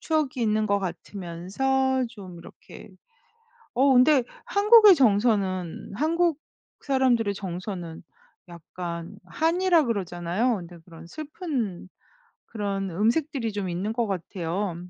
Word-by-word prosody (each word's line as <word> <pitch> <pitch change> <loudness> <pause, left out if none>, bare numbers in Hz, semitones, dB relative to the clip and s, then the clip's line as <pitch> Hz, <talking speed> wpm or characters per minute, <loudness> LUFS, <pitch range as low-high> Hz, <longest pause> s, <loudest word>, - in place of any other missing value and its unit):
추억이 300 -6 -1
있는 215 -1 +1
것 200 -1 +2
같으면서 200 +9 -2
좀 190 -6 -11
이렇게 170 - -14 0.8
어 270 +3 +4
근데 260 +1 +5 0.2
한국의 425 -3 +7
정서는 200 - +1
한국 325 +4 +1 0.4
사람들의 255 -6 +1
정서는 180 -3 -6 0.4
약간 170 +1 -7
한이라 345 0 +2
그러잖아요. 195 +1 -1
근데 175 0 -11
그런 165 -1 -13
슬픈 260 - -5 0.6
그런 200 -3 -3
음색들이 230 - 0
좀 200 -2 -3
있는 180 +5 -3
것 235 0 -1
같아요. 185 -1 -3
210 Hz, 245 characters per minute, -25 LUFS, 180-270 Hz, 0.8 s, 한국의